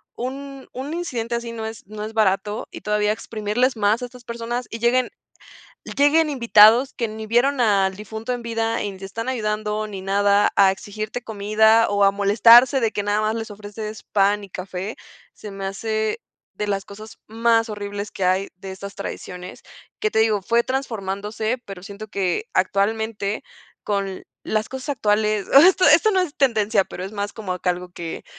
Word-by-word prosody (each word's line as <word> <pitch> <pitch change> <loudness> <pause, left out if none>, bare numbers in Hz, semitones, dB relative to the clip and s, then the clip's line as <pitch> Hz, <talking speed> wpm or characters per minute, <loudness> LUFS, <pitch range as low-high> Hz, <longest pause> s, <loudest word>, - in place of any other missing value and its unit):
un 275 +2 -6
un 275 +5 -5
incidente 240 -9 -3
así 235 0 -4
no 220 -1 -5
es 220 -3 -8
no 210 0 -7
es 220 +1 -6
barato, 210 0 0
y - - -10
todavía 210 0 +1
exprimirles 225 +4 -1
más 215 +3 +2
a - - -2
estas 245 -1 -14
personas 235 +1 -4
y 225 - -6
lleguen 245 +2 +2 0.8
y - - -6
lleguen 300 +3 +4
invitados 235 0 +6
que 230 -2 -2
ni 220 0 -7
vieron 250 +4 +2
al 195 -3 +2
difunto 220 +3 -5
en 245 -1 -4
vida 225 0 -1
y 205 -1 -3
ni 190 - -12
te 195 - -9
están 230 +5 -5
ayudando 215 -2 -2
ni 200 -2 -7
nada, 200 +1 +3
a 195 -1 +6
exigirte 215 +4 -5
comida 220 +2 +3
o 205 0 +3
a 195 - +6
molestarse 230 +6 +6
de 225 -1 0
que 205 - -2
nada 205 +1 0
más 215 +1 0
les 225 -1 -5
ofreces 210 +1 -8
pan 205 0 +1
y 195 - -13
café, 185 +3 -6 0.4
se 210 - -9
me 195 0 -7
hace 220 - -2 0.3
de 210 - -3
las 195 -1 -1
cosas 215 +2 -12
más 225 +1 +2
horribles 205 0 -5
que 190 - -3
hay 185 +2 +1
de 190 +1 -9
estas 200 +1 -8
tradiciones, 180 -2 -7 0.4
que 430 - 0
te 220 - +3
digo, 215 -2 +2
fue 235 +4 +2
transformándose, 220 -2 -3
pero 195 -2 -9
siento 205 +1 -9
que 195 - -1
actualmente 210 0 0 0.4
con 195 -2 -2 0.2
las 215 0 -1
cosas 265 +2 -5
actuales 215 -4 +1
ah, 275 - +10
esto 370 0 +4
esto 335 +8 +6
no 380 -2 +2
es 330 -5 -2
tendencia, 220 -6 +2
pero 180 - -8
es 195 - -7
más 205 0 -3
como 205 -5 -4
acá 180 0 -1
algo 180 0 -4
que 170 -2 -7
215 Hz, 190 wpm, -22 LUFS, 200-235 Hz, 0.8 s, ah